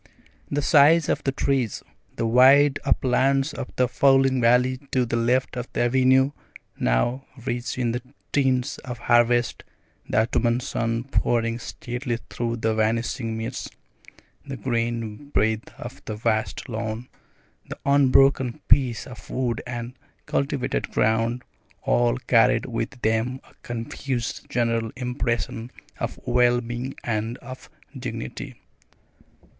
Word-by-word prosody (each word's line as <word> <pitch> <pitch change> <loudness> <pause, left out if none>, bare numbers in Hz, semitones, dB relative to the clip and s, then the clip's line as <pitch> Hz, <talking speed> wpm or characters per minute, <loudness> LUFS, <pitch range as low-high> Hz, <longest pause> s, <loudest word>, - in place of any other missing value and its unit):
The 145 0 -1
size 150 +3 +5
of - - 0
the 135 - +1
trees, 135 -5 -1 0.3
the - - -1
wide 135 +4 +6
uplands 135 +3 +2
of - - -5
the 125 - +2
falling 135 0 +3
valley 125 +2 +4
to 125 -1 +1
the 115 - -2
left 125 +3 +1
of 125 0 -5
the - - 0
avenue, 130 +2 +4 0.5
now 120 - +1 0.2
rich 120 -1 -3
in 120 -2 0
the 120 - -3 0.3
tints 135 -1 +1
of 125 -2 -7
harvest, 120 0 +2 0.5
the 105 - +3
autumn 120 +1 +1
sun 115 -2 -2
pouring 115 -3 0
steadily 120 +1 -4
through 120 -1 -2
the 110 -1 0
vanishing 115 +1 -1
mists, 115 0 -4 0.7
the 135 -1 -6
green 115 0 -2
breadth 110 -4 0
of - - -9
the 110 - -4
vast 110 0 -1
lawn, 115 0 -4 0.6
the - - -6
unbroken 135 -1 +4
peace 125 -2 +3
of 125 -3 -12
wood 125 -3 -1
and 120 0 -5 0.3
cultivated 70 -1 -1
ground, 115 +3 +1 0.4
all - - +2
carried - - +3
with - - -2
them 115 +4 0
a - - -22
confused 120 +1 -4
general 115 -2 0
impression 120 -2 -2 0.3
of - - -4
well 120 0 +3
being 120 +2 -5
and 115 +1 -2
of 130 0 -11 0.3
dignity. 65 - -6
120 Hz, 130 wpm, -24 LUFS, 115-130 Hz, 0.7 s, wide